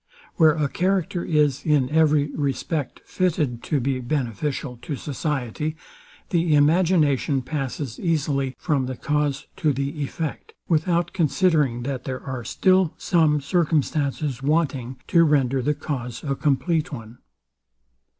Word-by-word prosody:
Where 160 Hz, -3 st, +5 dB
a 150 Hz, -2 st, +1 dB
character 180 Hz, +1 st, 0 dB
is, 145 Hz, -4 st, +1 dB
in 145 Hz, -4 st, +2 dB
every 150 Hz, -2 st, +3 dB
respect, 140 Hz, 0 st, -2 dB
fitted 155 Hz, -10 st, 0 dB
to 150 Hz, -, +1 dB
be 130 Hz, +1 st, -1 dB
beneficial 125 Hz, 0 st, -3 dB
to 145 Hz, -, -4 dB
society, 150 Hz, +1 st, -3 dB, 0.6 s
the 165 Hz, -3 st, +3 dB
imagination 150 Hz, -3 st, +3 dB
passes 135 Hz, -2 st, -4 dB
easily 140 Hz, -5 st, 0 dB
from 140 Hz, -6 st, 0 dB
the 130 Hz, -1 st, -5 dB
cause 150 Hz, -1 st, -1 dB
to 155 Hz, -, +2 dB
the 140 Hz, +3 st, -3 dB
effect, 150 Hz, +2 st, -4 dB
without 170 Hz, +1 st, +1 dB
considering 155 Hz, -7 st, +2 dB
that 135 Hz, -1 st, -4 dB
there 130 Hz, -1 st, -4 dB
are 130 Hz, -3 st, -5 dB
some 165 Hz, -, +2 dB
circumstances 145 Hz, -3 st, 0 dB
wanting 135 Hz, -4 st, 0 dB
to 170 Hz, -1 st, +5 dB
render 135 Hz, -4 st, +2 dB
the 150 Hz, +4 st, 0 dB
cause 125 Hz, -6 st, -5 dB
a 140 Hz, -2 st, -1 dB
complete 150 Hz, +5 st, 0 dB
one. 115 Hz, -3 st, -9 dB
145 Hz, 125 wpm, -23 LUFS, 135-160 Hz, 0.6 s, Where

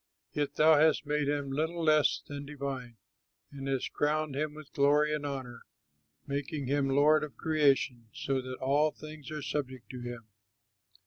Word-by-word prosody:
Yet 145 Hz, -1 st, -1 dB
thou 155 Hz, -1 st, +6 dB
hast 155 Hz, -1 st, +4 dB
made 150 Hz, 0 st, 0 dB
him 145 Hz, -1 st, -1 dB
little 160 Hz, +4 st, -1 dB
less 155 Hz, -2 st, +3 dB
than 145 Hz, 0 st, -6 dB
divine, 135 Hz, -5 st, -5 dB, 0.5 s
And 135 Hz, -1 st, -7 dB
hast 135 Hz, -2 st, -1 dB
crowned 150 Hz, -1 st, 0 dB
him 150 Hz, +1 st, -2 dB
with 155 Hz, -2 st, -12 dB
glory 150 Hz, +1 st, +3 dB
and 150 Hz, -1 st, -2 dB
honor, 130 Hz, -4 st, -6 dB, 0.6 s
Making 140 Hz, +1 st, -3 dB
him 140 Hz, +1 st, +1 dB
lord 150 Hz, +3 st, +4 dB
of 140 Hz, -7 st, -7 dB
creation, 140 Hz, -6 st, +2 dB
So 135 Hz, -1 st, -1 dB
that 130 Hz, 0 st, -6 dB
all 145 Hz, +4 st, +2 dB
things 155 Hz, -1 st, -10 dB
are 155 Hz, -1 st, -5 dB
subject 130 Hz, -4 st, -4 dB
to 125 Hz, -, -7 dB
him. 120 Hz, -2 st, -7 dB
145 Hz, 165 wpm, -31 LUFS, 135-150 Hz, 0.6 s, thou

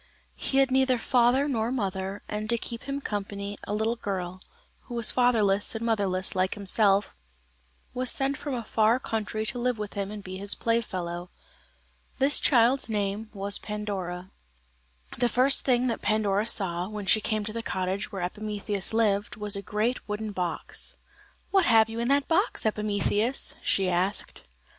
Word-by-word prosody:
He 270 Hz, -, -1 dB
had 270 Hz, -1 st, +4 dB
neither 260 Hz, -1 st, +3 dB
father 245 Hz, +3 st, +3 dB
nor 230 Hz, -4 st, 0 dB
mother, 195 Hz, -4 st, -3 dB
and 215 Hz, 0 st, -4 dB
to 235 Hz, -, +3 dB
keep 230 Hz, 0 st, -6 dB
him 280 Hz, +1 st, -3 dB
company, 200 Hz, -2 st, -4 dB
a -, -, -3 dB
little 220 Hz, +2 st, 0 dB
girl, 185 Hz, -4 st, -4 dB, 0.4 s
who 240 Hz, -, -7 dB
was 235 Hz, -2 st, +4 dB
fatherless 220 Hz, -5 st, +2 dB
and 225 Hz, +1 st, -3 dB
motherless 195 Hz, -5 st, 0 dB
like 185 Hz, +2 st, 0 dB
himself, 200 Hz, -, +2 dB, 0.8 s
was 255 Hz, 0 st, 0 dB
sent 275 Hz, +1 st, +1 dB
from 285 Hz, -1 st, -4 dB
a 235 Hz, -, -3 dB
far 220 Hz, +3 st, +2 dB
country 215 Hz, -2 st, -3 dB
to 245 Hz, +3 st, -1 dB
live 250 Hz, -1 st, 0 dB
with 210 Hz, -1 st, -5 dB
him 200 Hz, -1 st, -3 dB
and 210 Hz, -1 st, -7 dB
be 185 Hz, 0 st, -7 dB
his 200 Hz, +1 st, -4 dB
playfellow. 180 Hz, -7 st, -2 dB, 0.9 s
This 275 Hz, +2 st, +4 dB
child's 245 Hz, 0 st, +3 dB
name 210 Hz, 0 st, -2 dB
was 200 Hz, 0 st, 0 dB
Pandora. 190 Hz, -4 st, -5 dB, 0.9 s
The 245 Hz, -, +3 dB
first 255 Hz, +4 st, +3 dB
thing 250 Hz, -1 st, +3 dB
that 235 Hz, -3 st, -1 dB
Pandora 210 Hz, 0 st, +1 dB
saw, 180 Hz, -4 st, +1 dB
when 210 Hz, -2 st, -5 dB
she 215 Hz, +3 st, +4 dB
came 215 Hz, 0 st, -1 dB
to 215 Hz, -, -5 dB
the 230 Hz, -, -3 dB
cottage 190 Hz, -1 st, -3 dB
where 195 Hz, -3 st, -4 dB
Epimetheus 205 Hz, +1 st, -2 dB
lived, 210 Hz, -3 st, +1 dB
was 210 Hz, -1 st, +1 dB
a 200 Hz, -, -3 dB
great 215 Hz, +4 st, -2 dB
wooden 210 Hz, +1 st, -3 dB
box. 180 Hz, -4 st, -4 dB, 0.6 s
"What 390 Hz, -3 st, +4 dB
have 225 Hz, -2 st, +5 dB
you 225 Hz, +1 st, -5 dB
in 235 Hz, -, 0 dB
that 280 Hz, +1 st, +2 dB
box, 355 Hz, -, +1 dB
Epimetheus?" 210 Hz, +3 st, 0 dB
she 195 Hz, -1 st, +2 dB
asked. 180 Hz, +3 st, 0 dB
215 Hz, 165 wpm, -27 LUFS, 200-235 Hz, 0.9 s, have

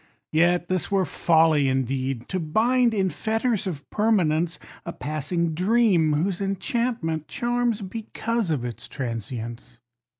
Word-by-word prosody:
Yet, 175 Hz, +2 st, +3 dB
this 185 Hz, -1 st, -1 dB
were 195 Hz, -2 st, +2 dB
folly 160 Hz, -2 st, +3 dB
indeed; 130 Hz, -1 st, -1 dB
to 190 Hz, -, -1 dB
bind, 235 Hz, +9 st, +2 dB
in 195 Hz, -4 st, +1 dB
fetters 220 Hz, -1 st, -1 dB
of 150 Hz, -6 st, -5 dB
permanence, 175 Hz, -7 st, +2 dB, 0.3 s
A 170 Hz, -, -5 dB
passing 160 Hz, +2 st, -2 dB
dream 185 Hz, -3 st, +3 dB
whose 175 Hz, +5 st, 0 dB
enchantment 195 Hz, -, -1 dB
charms 240 Hz, -2 st, 0 dB
because 225 Hz, +1 st, -3 dB
of 140 Hz, -6 st, -1 dB
its 120 Hz, -2 st, -6 dB
trancience. 120 Hz, -1 st, -6 dB
175 Hz, 125 wpm, -25 LUFS, 150-215 Hz, 0.3 s, Yet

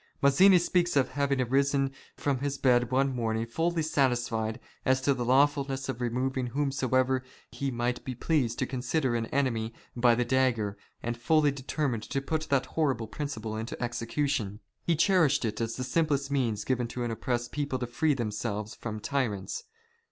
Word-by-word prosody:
Mazzini 180 Hz, +8 st, +6 dB
speaks 175 Hz, -1 st, +1 dB
of 135 Hz, -3 st, +3 dB
having 140 Hz, 0 st, 0 dB
arisen 135 Hz, +2 st, +2 dB, 0.3 s
from 140 Hz, -3 st, 0 dB
his 140 Hz, 0 st, -2 dB
bed 125 Hz, -3 st, +3 dB
one 135 Hz, +1 st, +1 dB
morning 115 Hz, -1 st, -1 dB
fully 165 Hz, +7 st, 0 dB
satisfied 120 Hz, -7 st, 0 dB, 0.2 s
as 130 Hz, 0 st, +3 dB
to 140 Hz, +1 st, +3 dB
the 125 Hz, -2 st, -3 dB
lawfulness 135 Hz, +1 st, +2 dB
of 125 Hz, -2 st, -3 dB
removing 125 Hz, +2 st, -1 dB
whom 140 Hz, +3 st, -1 dB
soever 130 Hz, -1 st, +1 dB, 0.3 s
he 140 Hz, -, -2 dB
might 120 Hz, 0 st, -2 dB
be 130 Hz, -, -5 dB
pleased 125 Hz, -3 st, 0 dB
to -, -, 0 dB
consider 130 Hz, +1 st, -1 dB
an 115 Hz, -1 st, -1 dB
enemy, 115 Hz, -5 st, -1 dB, 0.2 s
by 120 Hz, -1 st, +4 dB
the 120 Hz, +1 st, +1 dB
dagger, 120 Hz, -5 st, +1 dB, 0.3 s
and 120 Hz, 0 st, -2 dB
fully 150 Hz, +3 st, +3 dB
determined 135 Hz, -3 st, -2 dB
to 135 Hz, -, -2 dB
put 155 Hz, +3 st, -2 dB
that 140 Hz, -2 st, +2 dB
horrible 140 Hz, -8 st, 0 dB
principle 110 Hz, -3 st, -5 dB
into 110 Hz, +2 st, -5 dB
execution. 120 Hz, -2 st, -1 dB, 0.2 s
He 170 Hz, -, +1 dB
cherished 160 Hz, -, +3 dB
it 110 Hz, +1 st, -2 dB
as 115 Hz, 0 st, -2 dB
the 130 Hz, -, -3 dB
simplest 140 Hz, 0 st, 0 dB
means 115 Hz, -7 st, 0 dB
given 125 Hz, -2 st, 0 dB
to 120 Hz, +1 st, -4 dB
an 120 Hz, -, -2 dB
oppressed 120 Hz, +1 st, -2 dB
people 145 Hz, -3 st, -2 dB
to 125 Hz, -, -3 dB
free 145 Hz, +5 st, +1 dB
themselves 105 Hz, -2 st, -3 dB
from 110 Hz, -2 st, -5 dB
tyrants. 115 Hz, -, -2 dB
130 Hz, 175 wpm, -29 LUFS, 120-140 Hz, 0.3 s, Mazzini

